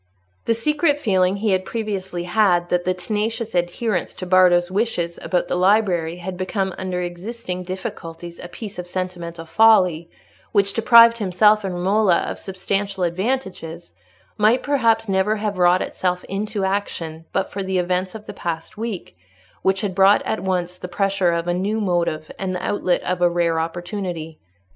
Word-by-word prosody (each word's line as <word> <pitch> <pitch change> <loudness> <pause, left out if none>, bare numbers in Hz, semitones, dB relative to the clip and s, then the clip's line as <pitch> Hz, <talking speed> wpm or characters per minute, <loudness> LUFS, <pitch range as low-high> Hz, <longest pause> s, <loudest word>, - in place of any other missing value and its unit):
The 230 - +2
secret 295 +5 +1
feeling 190 -7 +2
he 205 +1 0
had 185 0 +1
previously 190 -5 -4
had 175 -2 +2
that 175 0 0
the 185 - +2
tenacious 220 +4 -3
adherence 175 +3 -1
to 185 - -6
Bardo's 180 -1 +4
wishes 190 -5 -1
about 180 - 0
the - - -2
library 180 -3 +2
had 180 +1 -6
become 190 0 -2
under 180 -1 -3
existing 180 +2 -5
difficulties 175 -2 -7
a - - -7
piece 200 +1 -8
of 180 - -5
sentimental 175 -2 -5
folly, 180 -4 +4 0.4
which 200 -2 +3
deprived 230 +1 +7
himself 210 +2 +3
and 190 -2 -3
Romola 190 0 +2
of - - -5
substantial 195 0 -2
advantages, 175 - -3 0.5
might 220 +4 +4
perhaps 230 -6 +2
never 195 +2 +1
have 205 -3 -3
wrought 180 +1 +4
itself 180 -1 -2
into 205 0 -3
action 165 -5 -3
but - - -1
for 200 - -4
the 190 -1 -1
events 180 +2 -1
of 215 -1 -9
the - - -8
past 170 +5 -5
week, 225 - -5 0.5
which 190 0 +1
had 200 -3 -2
brought 195 +2 +5
at 220 - -2
once 180 -1 -2
the - - -6
pressure 195 -1 +1
of 170 0 -1
a 175 - +1
new 200 +5 -1
motive 170 -5 -1
and 185 -1 -2
the 180 - -4
outlet 185 -3 0
of 180 0 -2
a 175 - +5
rare 170 -1 +1
opportunity. 170 -1 -4
185 Hz, 165 wpm, -21 LUFS, 175-210 Hz, 0.5 s, deprived